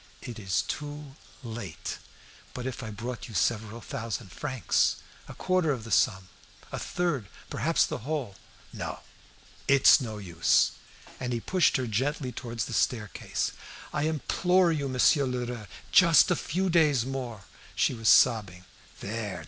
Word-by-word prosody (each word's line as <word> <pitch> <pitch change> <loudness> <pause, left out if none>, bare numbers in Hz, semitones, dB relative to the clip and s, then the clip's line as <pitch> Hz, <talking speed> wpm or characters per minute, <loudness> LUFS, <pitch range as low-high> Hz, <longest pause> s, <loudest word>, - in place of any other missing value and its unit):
"It 120 -2 -7
is 95 -3 0
too 145 -1 -6 0.3
late." 110 -7 -6 0.6
"But 125 - -5
if 130 0 -4
I 110 - -6
brought 115 +3 -6
you 110 - -10
several 110 +4 0
thousand 115 - -5
francs 130 -1 +1 0.3
a - - -10
quarter 185 -3 +1
of 125 -5 -3
the 115 - -9
sum 95 -6 +2 0.4
a - - -4
third 160 - -1 0.2
perhaps - - +2
the - - -4
whole?" 135 -5 -3 0.4
"No; - - -5 0.7
it's 140 +2 +7
no 110 -4 -5
use!" 85 -4 +2 0.5
And 125 -1 -3
he 120 - -1
pushed 180 +7 +2
her 130 - -2
gently 130 +4 -1
towards 115 -3 -4
the - - -7
staircase. 110 -5 -1 0.4
"I 145 - 0
implore 175 +3 +2
you, 145 -4 -1
Monsieur 135 +3 +4
Lheureux, 125 -3 -4 0.2
just 170 -3 +6
a - - +4
few 185 +5 -1
days 150 -8 +4
more!" 125 -6 -5 0.3
She - - +2
was 115 -2 +1
sobbing. 95 -6 +4 0.4
"There! 105 -1 -4
125 Hz, 150 wpm, -28 LUFS, 110-145 Hz, 0.7 s, it's